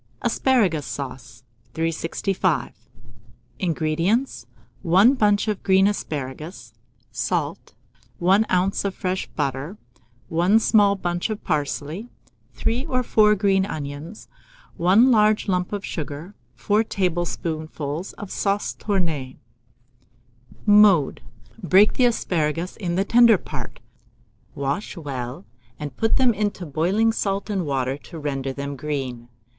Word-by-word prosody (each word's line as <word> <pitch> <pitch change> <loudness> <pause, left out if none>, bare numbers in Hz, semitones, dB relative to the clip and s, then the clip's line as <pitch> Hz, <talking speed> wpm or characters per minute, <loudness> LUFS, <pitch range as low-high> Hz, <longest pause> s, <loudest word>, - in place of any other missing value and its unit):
ASPARAGUS 200 - +2
SAUCE. 125 -4 -7 0.3
365. 165 +2 -1 0.9
INGREDIENTS. 170 - 0 0.3
1 190 +9 +5
bunch 210 -4 +2
of 210 -3 -1
green 190 0 +4
asparagus, 155 -4 -4 0.4
salt, - - -3 0.4
1 195 +4 +4
oz. 185 +2 +1
of 200 -1 -2
fresh 185 0 -2
butter, 140 +8 -3 0.5
1 175 +6 +3
small 205 -3 +4
bunch 175 0 -2
of 215 -1 -5
parsley, 155 +6 -3 0.5
3 235 +3 -1
or 255 -4 0
4 210 -2 +4
green 195 -1 +2
onions, 155 +2 -6 0.5
1 200 +9 +5
large 215 -2 +3
lump 180 -2 0
of 205 -1 -4
sugar, 155 +4 -6 0.2
4 205 - +1
tablespoonfuls 165 -4 -3
of 205 - -9
sauce 200 0 -1
tournée. 165 -10 -2 1.3
Mode. 205 -8 +5 0.4
Break 190 +4 +5
the 255 - +3
asparagus 170 -7 -1
in 175 -5 -3
the 195 +2 +1
tender 235 -1 +6
part, - - -8 0.8
wash 140 +9 -3
well, 135 +1 -6 0.3
and 145 -3 -6
put 225 +8 +1
them 255 -3 +4
into 205 -3 -2
boiling 185 +10 +1
salt 200 0 -2
and 190 -6 -1
water 135 -1 -1
to 165 - -11
render 135 -3 -3
them 140 +1 -5
green. 130 -5 -4
180 Hz, 115 wpm, -23 LUFS, 150-205 Hz, 1.3 s, tender